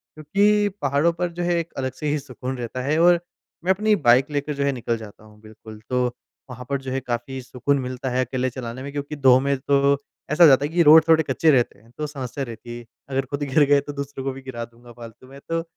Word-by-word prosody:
क्योंकि 205 +7 +2
पहाड़ों 145 +4 +2
पर 175 +1 -3
जो 175 +1 -4
है, 175 0 +1
एक 170 0 -6
अलग 130 -1 -2
से 150 +3 -5
ही 150 +1 0
सुकून 130 -1 -6
रहता 120 +1 -5
है, 145 +4 0
और 175 +1 +5 0.4
मैं 185 - +2
अपनी 210 +2 +2
बाइक 130 +5 +4
लेकर 145 +1 -2
जो 140 0 -2
है 140 - +2
निकल 120 -3 -2
जाता 110 -1 -12
हूँ, 105 -1 -18
बिल्कुल। 110 0 -13
तो 125 0 +1 0.4
वहाँ 125 0 -9
पर 140 -1 -1
जो 130 -1 -6
है 135 - -1
काफ़ी 130 +1 -4
सुकून 130 +3 -1
मिलता 130 0 -4
है, 130 +1 0
अकेले 130 +1 -2
चलाने 125 0 -7
में। 140 - -6
क्योंकि 145 +1 -5
2 130 -3 +5
में 140 +1 0
तो 140 +1 +2 0.3
ऐसा 160 +3 +5
हो - - +10
जाता 140 0 +5
है, - - -3
कि 175 +1 +2
रोड़ 160 +1 +9
थोड़े 160 -1 +5
कच्चे 160 +2 +1
रहते 120 -7 +1
हैं 115 +2 -23
तो 150 - -3
समस्या 135 -2 -5
रहती 120 -1 -8
है। 120 - -11 0.2
अगर 135 0 -1
खुद 140 +2 -5
ही - - -3
गिर 145 +3 +4
गए 145 0 +6
तो 145 +1 -8
दूसरे 140 -1 -6
को 135 - -2
भी 135 - -10
गिरा 125 -3 -6
दूँगा 120 +1 -18
फ़ालतू 115 +2 -13
में। 135 +1 -13
तो 165 0 -1
135 Hz, 255 wpm, -23 LUFS, 125-150 Hz, 0.4 s, हो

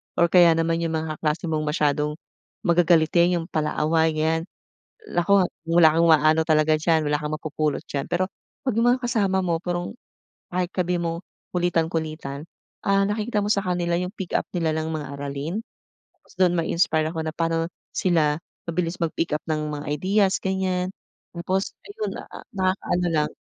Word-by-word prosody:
or 170 -1 +3
kaya 175 -2 +7
naman 165 0 +1
'yung 165 -1 -1
mga 155 -1 -3
kaklase 160 +1 -1
mong 155 -1 -1
masyadong 150 0 +1 0.5
magagalitin, 170 0 +4
'yung 165 - -5
palaaway 155 +1 +1
ganiyan. 160 +1 +1 0.7
Naku, 185 +1 +3 0.2
wala 165 -1 +5
kang 170 - +4
maano 155 0 +5
talaga 155 0 +3
diyan, 160 0 +2
wala 150 - +2
kang 150 0 -4
mapupulot 155 -1 -2
diyan. 140 0 -2
Pero 185 +2 -1 0.3
'pag 260 - -1
'yung 230 - +3
mga 250 +1 +3
kasama 200 -6 +1
mo 170 -3 0
parang 175 +5 -4 0.6
kahit 180 -1 0
sabihin 180 -2 -1
mong 165 0 -2 0.3
kulitan-kulitan, 160 -4 -2 0.4
ah, 195 0 +4
nakikita 210 +1 0
mo 205 - -2
sa 200 -2 +1
kanila 175 -1 0
'yung 180 +2 -4
pick 190 -3 -6
up - - -4
nila 165 -2 +1
ng 160 0 -2
mga 150 -2 -4
aralin, 145 +6 -4 0.6
tas - - -23
do'n 185 -1 +4
mai-inspire 165 -2 +1
ako 160 0 -4
na 160 - -3
pa'no 165 0 0 0.3
sila 160 -5 +2 0.3
mabilis 170 +1 -2
mag-pick 165 -1 -1
up 150 - 0
ng 155 -1 -1
mga 145 0 -5
ideas 190 +6 +2
ganiyan. 190 -1 -1 0.4
Tapos 185 +3 -2 0.2
ayun 425 +1 -4
na - - -6
a - - -11
nakakaano 185 -2 0
lang. 155 -3 0
165 Hz, 165 wpm, -24 LUFS, 155-180 Hz, 0.7 s, kaya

